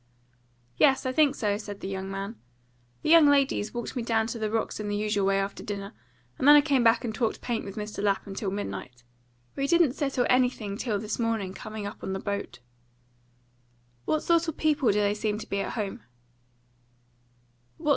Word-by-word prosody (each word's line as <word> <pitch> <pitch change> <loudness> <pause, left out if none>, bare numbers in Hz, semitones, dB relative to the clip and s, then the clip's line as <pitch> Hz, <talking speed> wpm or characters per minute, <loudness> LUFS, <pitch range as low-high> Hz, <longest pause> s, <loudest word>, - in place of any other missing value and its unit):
"Yes, 270 -1 +4
I 255 - 0
think 285 0 +3
so," 205 -5 0
said 205 -2 -7
the - - -4
young 190 0 -4
man. 195 +3 -5 0.7
"The 310 - +1
young 330 -3 +8
ladies 275 -7 +2
walked 240 +2 -5
me 245 - -1
down 225 -1 +1
to 230 - -7
the 215 -1 -1
rocks 225 0 -2
in 210 - -4
the 205 - -1
usual 205 -1 0
way 195 0 +3
after 195 0 -3
dinner, 200 -1 -5 0.5
and 265 - +1
then 295 - +10
I 295 - +8
came 280 -4 +2
back 230 +1 +4
and 220 - -3
talked 225 0 -1
paint 235 -2 -3
with 195 - -7
Mr. 210 -1 -5
Lapham 200 -1 0
till 195 0 -3
midnight. 125 -11 -6 0.5
We 275 0 -1
didn't 335 -4 +4
settle 270 -4 0
anything 250 -5 +1
till 215 -1 -1
this 210 +3 -4
morning 225 -5 -1
coming 215 +1 -7
up 205 - -7
on 190 - -3
the 190 - -3
boat." 200 - -4 1.4
"What 310 - +1
sort 335 0 +3
of 320 - -4
people 300 -5 +2
do 210 +1 +1
they 205 0 +2
seem 210 0 -2
to 220 - -8
be 200 - -2
at - - -3
home?" 205 - -4
215 Hz, 195 wpm, -27 LUFS, 200-260 Hz, 1.4 s, then